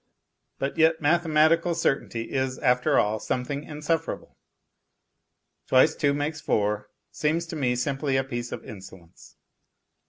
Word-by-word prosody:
But 135 +4 -3
yet 160 0 +4
mathematical 165 +1 +3
certainty 130 -7 -1
is, 130 -1 -1
after 125 +2 +2
all, 105 +1 +2
something 140 +6 -3
insufferable. 155 +2 -3 1.3
Twice 130 0 +5
two 140 -1 +1
makes 150 +2 -3
four 105 -8 0 0.2
seems 155 +10 0
to 165 0 -7
me 125 -5 0
simply 135 +2 -1
a 135 - +1
piece 120 -2 -5
of - - -7
insolence. 95 -4 -13
140 Hz, 125 wpm, -26 LUFS, 125-155 Hz, 1.3 s, Twice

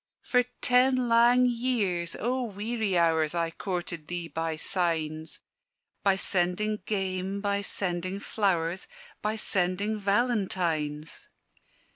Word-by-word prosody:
"For 250 -1 +2 0.2
ten 255 0 +4
lang 240 +2 +5
years, 230 -9 0
O 250 +2 0
weary 215 -2 -1
hours! 160 -1 +2
I 165 -1 0
coorted 175 -3 -4
thee 175 -1 -3
by 165 -1 -2
signs; 160 -2 -1 0.6
By 195 -1 +3
sending 195 +3 0
game, 190 -1 -2
by 200 0 0
sending 185 -1 -2
flowers, 185 -5 -1 0.3
By 215 +1 -1
sending 200 +1 0
Valentines. 185 -9 -1
190 Hz, 105 wpm, -28 LUFS, 170-220 Hz, 0.6 s, lang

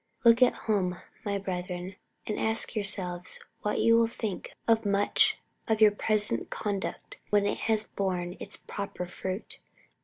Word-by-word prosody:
Look 230 +1 +7
at 250 - +6
home, 185 -5 +1 0.2
my 200 -1 -1
brethren, 180 -1 -4 0.3
and 210 - -2
ask 220 +1 +1
yourselves 185 -4 -3 0.2
what 210 - 0
you 230 0 +6
will 230 - +4
think 220 -4 -4 0.2
of 225 -1 +4
much 200 0 +3 0.3
of 220 -2 +2
your 215 -1 +8
present 210 - +1
conduct 200 -3 -4
when 205 -1 +3
it 205 - 0
has 220 -1 +3
borne 180 -4 -2
its - - -5
proper 200 -3 -5
fruit. 185 +3 -5
205 Hz, 150 wpm, -29 LUFS, 185-220 Hz, 0.3 s, your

